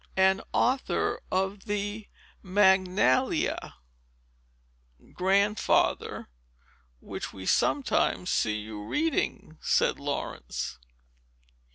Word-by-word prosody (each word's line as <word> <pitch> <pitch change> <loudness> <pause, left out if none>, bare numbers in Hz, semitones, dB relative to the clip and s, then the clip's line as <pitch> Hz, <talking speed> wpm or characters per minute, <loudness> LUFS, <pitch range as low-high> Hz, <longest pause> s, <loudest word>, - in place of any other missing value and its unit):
"And 190 0 +4
author 265 - +1
of 190 +1 -1
the 205 +1 -3 0.3
Magnalia, 190 -7 +2 1.4
Grandfather, 200 +3 +1 0.7
which - - -6
we 95 -1 -9
sometimes 255 - +1
see 105 -1 +1
you 105 -1 -7
reading," 215 - -2
said - - +2
Laurence. 140 - -4
190 Hz, 70 wpm, -28 LUFS, 155-205 Hz, 1.4 s, And